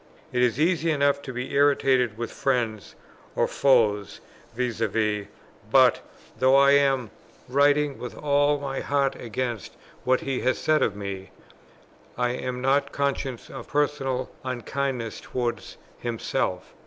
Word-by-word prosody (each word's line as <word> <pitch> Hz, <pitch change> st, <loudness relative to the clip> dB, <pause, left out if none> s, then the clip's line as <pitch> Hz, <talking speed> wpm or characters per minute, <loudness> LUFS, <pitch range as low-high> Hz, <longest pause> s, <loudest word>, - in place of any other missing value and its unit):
It 125 Hz, -, +1 dB
is 125 Hz, +1 st, +2 dB
easy 165 Hz, 0 st, +2 dB
enough 140 Hz, -2 st, +2 dB
to 135 Hz, -, -7 dB
be 125 Hz, 0 st, -5 dB
irritated 135 Hz, -5 st, +3 dB
with 115 Hz, 0 st, -4 dB
friends 120 Hz, -6 st, -1 dB, 0.4 s
or -, -, +2 dB
foes 110 Hz, -7 st, +2 dB, 0.4 s
vis 120 Hz, -2 st, -2 dB
à 115 Hz, -2 st, +1 dB
vis; 105 Hz, -1 st, -1 dB, 0.4 s
but, -, -, +5 dB, 0.4 s
though 130 Hz, +1 st, +5 dB
I 140 Hz, 0 st, +6 dB
am 135 Hz, -5 st, +3 dB, 0.4 s
writing 145 Hz, +2 st, +2 dB
with 125 Hz, -, -7 dB
all 145 Hz, 0 st, +2 dB
my 135 Hz, -1 st, -4 dB
heart 140 Hz, -1 st, 0 dB
against 120 Hz, -1 st, -4 dB, 0.3 s
what 130 Hz, 0 st, +2 dB
he 135 Hz, -2 st, -2 dB
has 130 Hz, -, +1 dB
said 155 Hz, -1 st, +2 dB
of 100 Hz, -, +1 dB
me, 100 Hz, -2 st, -6 dB, 0.9 s
I 125 Hz, 0 st, +1 dB
am 125 Hz, 0 st, -4 dB
not 135 Hz, +2 st, +2 dB
conscious 140 Hz, -3 st, -2 dB
of 135 Hz, -4 st, -8 dB
personal 140 Hz, -3 st, -1 dB
unkindness 130 Hz, -1 st, -3 dB
towards 120 Hz, -2 st, -4 dB, 0.2 s
himself. 120 Hz, -2 st, -2 dB
130 Hz, 140 wpm, -25 LUFS, 120-140 Hz, 0.9 s, I